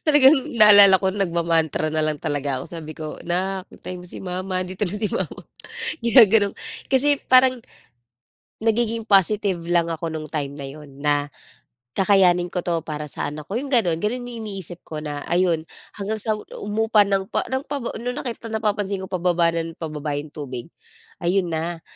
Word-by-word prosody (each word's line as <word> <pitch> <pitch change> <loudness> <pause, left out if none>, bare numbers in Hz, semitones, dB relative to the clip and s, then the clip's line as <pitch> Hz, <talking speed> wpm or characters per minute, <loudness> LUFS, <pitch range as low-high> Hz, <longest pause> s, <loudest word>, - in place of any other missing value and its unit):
Talagang 295 -1 +7 0.2
naalala 205 -4 +8
ko, 190 - +2
nagma-mantra 170 -5 0
na 155 - -1
lang 155 -1 0
talaga 145 -4 -1
ako. - - -7
Sabi 155 -2 -7
ko, 155 0 -7
"'Nak, 185 +2 -1
antayin 180 0 -8
mo 180 - -11
si - - -8
mama, 185 0 -3
andito 185 +3 -3
na 180 - -4
si 210 0 -1
mama, - - -4 0.6
gina-ganon" 225 -4 +6 0.4
kasi 285 +2 +5
parang 255 -2 +5 1.0
nagiging 225 0 0
positive 200 -1 +3
lang 170 -1 +1
ako 165 0 -3
nung 155 -1 -6
time 140 -2 -3
na 140 -1 -7
yun 140 -1 -12
na, 145 -1 0 0.6
"Kakayanin 180 -2 +3
ko 180 - -2
'to 170 -2 0
para 150 -1 -5
sa 145 - -4
anak 150 0 -8
ko." 200 - -3
yung 280 - -6
ganun. 205 -11 +2
Ganun 245 +4 -2
yung 240 -2 -7
iniisip 190 -4 -7
ko, 155 - -8
na 150 -1 -5
ayon, 175 -2 +2 0.3
hanggang 210 +2 -3
sa 220 - +1 0.2
humupa 215 0 +2
ng 195 -1 -1
pa - - -1
ng 265 +1 -2
pa 290 - -1 0.2
nung 245 +1 -3
nakita 230 -2 -5
napapansin 205 -3 -1
ko, - - -11
pababa 175 -2 +1
ng 165 0 -4
pababa 150 -2 -4
na - - -1
yung 150 - -16
tubig. 130 -5 -6 0.6
Ayon 180 +1 +1
na, 165 +1 -3
185 Hz, 180 wpm, -23 LUFS, 160-210 Hz, 1.0 s, naalala